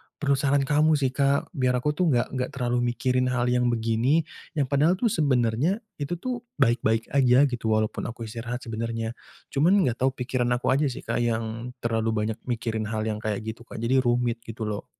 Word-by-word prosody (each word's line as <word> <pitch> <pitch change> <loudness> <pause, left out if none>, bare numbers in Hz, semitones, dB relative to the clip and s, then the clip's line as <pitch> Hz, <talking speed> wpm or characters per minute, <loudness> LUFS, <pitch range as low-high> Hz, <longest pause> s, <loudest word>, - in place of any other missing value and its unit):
perlu 140 -1 -1
saran 140 0 +2
kamu 150 +3 +3
sih 135 -3 +1
Kak 140 +1 +1
biar 125 -2 +1
aku 125 +4 +1
tuh 175 +4 0
gak 120 -6 +1
gak 125 - 0
terlalu 125 -1 0 0.2
mikirin 125 0 +1
hal 125 -1 +1
yang 125 0 +2
begini 120 +6 +2 0.3
yang 145 - +2
padahal 145 +6 +3
tuh 225 +3 0
sebenarnya 140 - +1 0.2
itu 145 +4 -2
tuh 245 +8 -4 0.2
baik-baik 115 -3 +1
aja 130 -1 +5
gitu 120 -5 -1
walaupun 110 0 -1
aku 115 0 -7
istirahat 120 +2 -5
sebenarnya. 115 0 -3 0.4
Cuman 160 +8 +4
gak 120 -1 -2
tahu 135 - +4
pikiran 125 -1 -1
aku 120 - -3
aja 140 +3 +3
sih - - -8
Kak - - -1
yang 115 +1 -2
terlalu 115 -1 0
banyak 110 0 -1
mikirin 115 -2 -2
hal 110 0 -2
yang 105 -1 -2
kayak 105 -2 -1
gitu 110 +1 -6
Kak - - -10
jadi 130 +3 +3
rumit 120 -1 +1
gitu 115 -1 -7
loh. 105 -1 -4
125 Hz, 195 wpm, -26 LUFS, 115-140 Hz, 0.4 s, aja